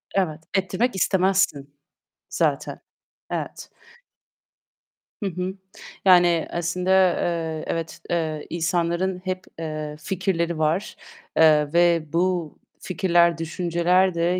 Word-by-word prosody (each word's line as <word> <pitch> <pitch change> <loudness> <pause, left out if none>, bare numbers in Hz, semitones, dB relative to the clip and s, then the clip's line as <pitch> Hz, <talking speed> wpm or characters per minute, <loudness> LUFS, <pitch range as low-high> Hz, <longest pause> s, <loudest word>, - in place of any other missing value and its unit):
Evet, 160 -5 0
ettirmek 195 +5 0
istemezsin 185 -7 +1 0.5
zaten. - - -1 0.5
Evet. - - -5 1.6
Hı 200 - 0
hı. 180 +1 -4 0.5
Yani 175 -3 +5
aslında, 180 +2 -1 0.3
eee, 165 -2 -2
evet, 165 -1 -4
eee, 160 -3 -2
insanların 170 +2 -1
hep, 185 0 -2 0.2
eee, 155 -2 -4
fikirleri 170 -1 -1
var, 160 +6 0 0.4
eee 155 -2 +5
ve 170 -2 +4
bu 175 -2 0 0.2
fikirler, 170 -2 +2
düşünceler 175 +3 +1
de 170 +2 +1
170 Hz, 95 wpm, -23 LUFS, 160-185 Hz, 1.6 s, Yani